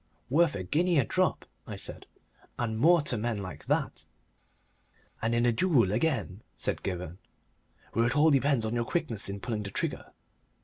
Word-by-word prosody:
"Worth 165 -1 +3
a 95 - -3
guinea 170 - +1
a 135 - +4
drop," - - 0 0.3
said - - -5 0.5
I, - - -1
"and 110 -2 -2
more 170 +3 +5
to 125 -5 0
men 115 0 -1
like 90 -7 -7
that." - - -1 1.1
"And 115 +1 +1
in 120 +1 +2
a 120 - +4
duel, 120 - +3
again," 110 - -1 0.2
said - - -2
Gibberne, 90 -1 -5 0.7
"where 115 - +2
it 125 - -1
all 155 +2 +5
depends 135 -4 +2
on 110 - -2
your 120 0 +1
quickness 120 - -1
in 100 +1 -5
pulling 110 0 -3
the 100 - -5
trigger." - - -3
115 Hz, 175 wpm, -29 LUFS, 100-145 Hz, 1.1 s, more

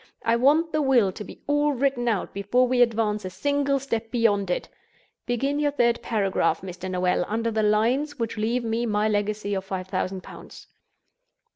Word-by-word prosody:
I 230 +1 +3
want 300 +7 +3
the 310 - +1
will 250 -8 +3
to 210 - -8
be - - -13
all 290 0 +2
written 260 -2 0
out 215 -5 -1
before 205 +6 +2
we 250 0 +2
advance 220 -3 +1
a 185 - -4
single 285 +6 0
step 230 -4 -3
beyond 210 -5 +1
it. 180 - -1 0.6
Begin 275 +4 0
your 295 -1 +2
third 240 -4 +1
paragraph, 200 -4 0
Mr. 185 0 -7
Noel, 180 -1 +1
under 230 +2 -1
the 220 0 0
lines 240 +8 +1
which 230 -2 -3
leave 230 +3 -1
me 230 +1 -1
my 210 0 +1
legacy 205 -1 -1
of 190 -1 -2
five 190 -1 -5
thousand 185 0 -2
pounds." - - -12
230 Hz, 180 wpm, -25 LUFS, 205-260 Hz, 0.6 s, I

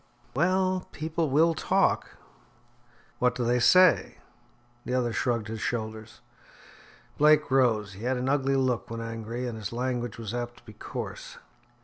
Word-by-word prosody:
"Well, 185 +4 +1
people 160 +1 -2
will 160 +5 +4
talk." - - 0 1.0
"What 125 0 +2
do 125 - -2
they 120 +1 +2
say?" 180 +8 +5 0.7
The 125 - -2
other 120 -2 0
shrugged 115 -3 -1
his 110 0 -6
shoulders. 110 -1 -4 1.0
Blake 150 -1 +4
rose. 115 -7 +2
He 95 - -12
had 130 0 0
an 125 +1 -2
ugly 135 0 +1
look 125 -7 0
when 115 0 -5
angry, 115 +1 -5
and 120 - -5
his 105 -2 -6
language 120 -1 -3
was 115 -2 -6
apt 120 0 -4
to - - -19
be 110 - -12
coarse. - - -7
125 Hz, 150 wpm, -27 LUFS, 115-135 Hz, 1.0 s, say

